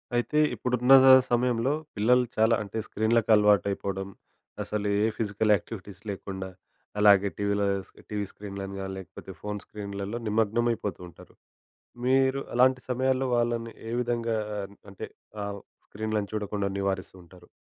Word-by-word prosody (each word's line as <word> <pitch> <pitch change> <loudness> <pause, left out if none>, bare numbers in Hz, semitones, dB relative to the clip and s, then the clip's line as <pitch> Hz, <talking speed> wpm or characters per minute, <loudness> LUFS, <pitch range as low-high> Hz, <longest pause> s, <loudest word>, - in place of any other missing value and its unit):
అయితే 120 +5 0 0.2
ఇప్పుడున్న 125 +1 +3 0.4
సమయంలో 120 +2 +2 0.2
పిల్లలు 125 +4 +4
చాలా 110 +1 +4
అంటే 100 +2 -7
స్క్రీనులకి 110 +1 +1
అలవాటైపోవడం. 100 -2 +2 0.6
అసలు 105 -1 -3
ఏ - - +3
ఫిజికల్ 105 0 +1
యాక్టివిటీస్ 100 0 -8
లేకుండా, 95 -1 -5 0.5
అలాగే 100 -1 +6
టీవీలో 100 0 0 0.2
స్ - - -25 0.2
టీవీ 105 -1 -2
స్క్రీనులను 100 -1 -7
గాని, 95 0 -5
లేకపోతే 95 -4 -10
ఫోను 105 -1 -4
స్క్రీనులలో 100 +2 -5
నిమగ్నమైపోతూ 110 -1 0
ఉంటారు. 85 - -17 0.7
మీరు 135 +1 +3
అలాంటి 125 +1 +4
సమయాల్లో 130 +1 +1
వాళ్ళని 120 -1 -1 0.2
ఏ - - -4
విధంగా 115 -2 -1 0.5
అంటే 100 - -7 0.4
ఆహ్, 100 0 -5 0.3
స్క్రీనులను 110 -1 -2
చూడకుండా 105 -1 -2
నివారిస్తుంటారు? 95 -2 -5
105 Hz, 120 wpm, -27 LUFS, 100-120 Hz, 0.7 s, అలాగే